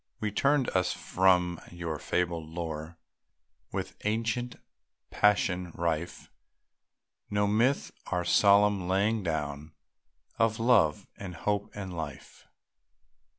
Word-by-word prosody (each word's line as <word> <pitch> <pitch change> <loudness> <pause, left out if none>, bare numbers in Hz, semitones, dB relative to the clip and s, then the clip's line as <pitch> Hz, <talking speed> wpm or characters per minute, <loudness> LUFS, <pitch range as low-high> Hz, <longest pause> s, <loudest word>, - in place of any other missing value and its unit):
We 105 -1 -2
turned 140 +4 +2
us 90 -1 +1
from 90 -2 +2
your 85 -3 -5
fabled 85 -3 -1
lore, 80 -1 -5 0.7
With - - -4
ancient 115 +3 -1 0.6
passion 95 -3 +2
rife; 85 0 -3 1.0
No 105 0 +1
myth, 115 +7 +1 0.2
our 90 -1 -1
solemn 100 0 +4
laying 100 +4 +1
down 75 -3 -3 0.7
Of 115 -1 +2
love, 110 -11 +3
and 95 -3 -7
hope, 100 +3 -1
and 95 -3 -6
life. 85 - -8
95 Hz, 105 wpm, -29 LUFS, 85-105 Hz, 1.0 s, solemn